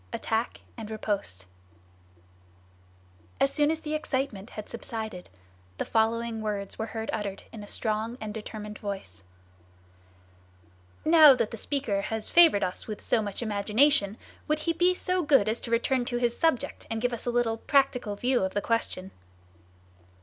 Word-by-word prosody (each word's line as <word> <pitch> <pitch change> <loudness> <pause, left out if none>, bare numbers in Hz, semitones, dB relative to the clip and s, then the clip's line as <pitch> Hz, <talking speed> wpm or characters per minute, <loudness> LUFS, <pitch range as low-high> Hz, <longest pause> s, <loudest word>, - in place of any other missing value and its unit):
ATTACK 225 +2 -2 0.2
AND 220 -2 -7
RIPOSTE 200 - -3 1.9
As 275 - +3
soon 295 -1 +3
as 320 0 -1
the 305 -1 -4
excitement 260 -8 -2
had 215 - -8
subsided, 220 -5 -6 0.5
the - - -2
following 225 0 0
words 205 -2 -4
were 220 - -2
heard 220 0 -4
uttered 200 -2 -4
in 220 - -9
a 205 - -9
strong 220 +3 -2
and 215 -1 -5
determined 210 -1 -7
voice: 190 - -6 1.8
"Now 310 -3 +9
that 230 -3 -1
the - - -4
speaker 230 -6 -1
has 220 +1 -2
favored 335 -11 +6
us 180 - -3
with 215 -2 -5
so 225 - +1
much 205 +2 -4
imagination, 210 +1 +3 0.3
would 305 0 0
he 335 +1 0
be 355 +2 +3
so 365 0 0
good 275 -9 +4
as 220 +2 -1
to - - -6
return 245 +2 +2
to 240 -1 -2
his 240 -1 +1
subject, 325 -7 0
and 225 - -2
give 245 +1 0
us 235 - -5
a - - +2
little 240 -2 +1
practical 250 -5 +1
view 245 +4 +1
of 190 +1 -2
the - - +3
question?" 195 -5 -2
225 Hz, 160 wpm, -28 LUFS, 210-260 Hz, 1.9 s, Now